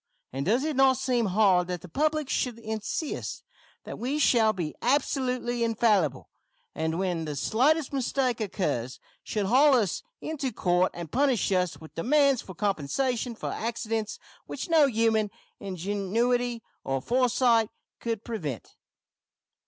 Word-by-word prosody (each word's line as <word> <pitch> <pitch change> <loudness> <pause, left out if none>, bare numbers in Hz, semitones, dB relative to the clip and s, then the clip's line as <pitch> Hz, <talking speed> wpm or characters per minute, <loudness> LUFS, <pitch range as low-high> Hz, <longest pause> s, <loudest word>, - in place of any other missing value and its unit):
And 135 +4 -3
does 240 +6 +2
it 310 -1 -1
not 265 -1 +5
seem 250 -4 +1
hard 185 -2 +3
that 180 -2 -4
the - - -10
public 305 - 0
should 250 -3 -1
insist 220 +6 -4 0.4
that - - -8
we 260 +5 -1
shall 230 -7 +4
be 175 -7 -4
absolutely 250 -2 0
infallible, 210 - +1 0.5
and, 160 +1 -2
when 175 -3 -1
the 150 -1 -4
slightest 270 - +2
mistake 255 -2 0
occurs, 150 - -2 0.2
should 210 -2 -2
haul 265 +7 +5
us 215 -7 +1 0.2
into 285 -5 -3
court 180 -3 +2
and 170 -3 -7
punish 265 -6 +2
us 180 -2 0
with 160 - -13
demands 275 - +3
for 185 - -11
compensation 220 - -1
for - - -4
accidents 225 -1 -3 0.3
which - - -5
no 310 -3 +6
human 220 -3 +2 0.3
ingenuity 205 +6 -1 0.2
or 135 0 -1
foresight 245 - +2 0.3
could 230 -2 -3
prevent? 155 - -5
225 Hz, 135 wpm, -27 LUFS, 185-255 Hz, 0.5 s, no